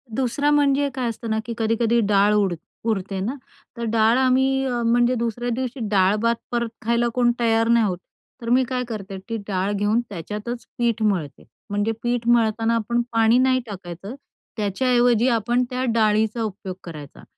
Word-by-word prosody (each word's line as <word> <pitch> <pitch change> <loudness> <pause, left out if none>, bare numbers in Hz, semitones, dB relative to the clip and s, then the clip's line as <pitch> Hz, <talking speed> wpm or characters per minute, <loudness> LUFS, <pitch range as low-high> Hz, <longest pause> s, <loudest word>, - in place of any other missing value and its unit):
2रा 265 +3 0
म्हणजे 285 -1 +3
काय 250 -3 -1
असतं 230 0 -6
ना, 220 0 0
की 235 - -4
कधी-कधी 230 +1 +1
डाळ 205 +1 +4
उड 200 -4 +2 0.4
उरते 195 -2 -2
ना, 220 +8 -2 0.4
तर 235 - -4
डाळ 225 +2 +4
आम्ही 265 +1 +2
अ, 245 -2 -1
म्हणजे 240 +2 +3
दुसऱ्या 235 +1 -2
दिवशी 255 +1 -4
डाळ-भात 210 +4 +2 0.2
परत 235 -1 -1 0.2
खायला 235 +1 +2
कोण 240 -1 +3
तयार 225 -1 +2
नाही 235 -1 +4
होत. 185 -3 -1 0.4
तर 230 - -4
मी 255 +2 +4
काय 250 0 -2
करते, 195 -4 -6
ती 230 - -2
डाळ 195 0 -1
घेऊन 205 +3 +1
त्याच्यातच 210 +6 -6
पीठ 235 -2 0
मळते, 175 -9 -1 0.3
म्हणजे 205 +2 0
पीठ 240 -1 -1
मळताना 230 -1 +2
आपण 235 +2 0
पाणी 225 +1 +4
नाही 255 0 +3
टाकायचं, 195 +2 -8 0.4
त्याच्याऐवजी 240 +3 +2
आपण 240 +1 +1
त्या 255 0 -2
डाळीचा 220 +1 +2
उपयोग 195 -3 -5
करायचा 150 -5 -10
230 Hz, 165 wpm, -22 LUFS, 210-245 Hz, 0.4 s, डाळ